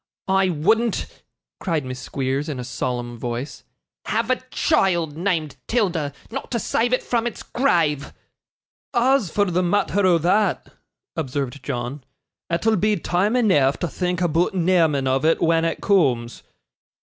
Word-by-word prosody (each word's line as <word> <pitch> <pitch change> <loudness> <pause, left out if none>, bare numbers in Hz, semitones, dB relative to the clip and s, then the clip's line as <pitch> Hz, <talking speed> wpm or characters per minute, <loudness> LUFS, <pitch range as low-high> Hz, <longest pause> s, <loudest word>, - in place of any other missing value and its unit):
I 190 0 +3
wouldn't,' 215 +8 +1 0.5
cried 160 -7 -1
Miss 130 0 -6
Squeers 135 +3 -2
in 140 -4 -4
a - - -4
solemn 120 -1 -4
voice, 120 +3 -5 0.4
'have 230 +3 0
a 255 - +3
child 175 - +1
named 165 -5 -1
'Tilda, 180 -11 0 0.2
not 270 +3 -5
to 240 - -1
save 235 +2 0
it 255 - +1
from 235 -1 0
its 240 - -6
grave.' 165 - +1 0.8
'As 245 -4 +3
for 205 +5 +1
the 180 -1 0
matther 205 +2 +1
o' 175 -2 +5
that,' 190 +6 +1 0.4
observed 140 -3 -3
John, 125 +1 -4 0.5
'it'll 210 +6 +1
be 210 +3 +2
time 200 +5 0
eneaf 150 - +3
to 175 - -2
think 180 +2 -2
aboot 175 +2 +1
neaming 165 -6 +2
of 130 +1 +1
it 160 +1 +3
when 165 0 +2
it 165 - -2
cooms. 130 - +1
170 Hz, 150 wpm, -22 LUFS, 140-205 Hz, 0.8 s, o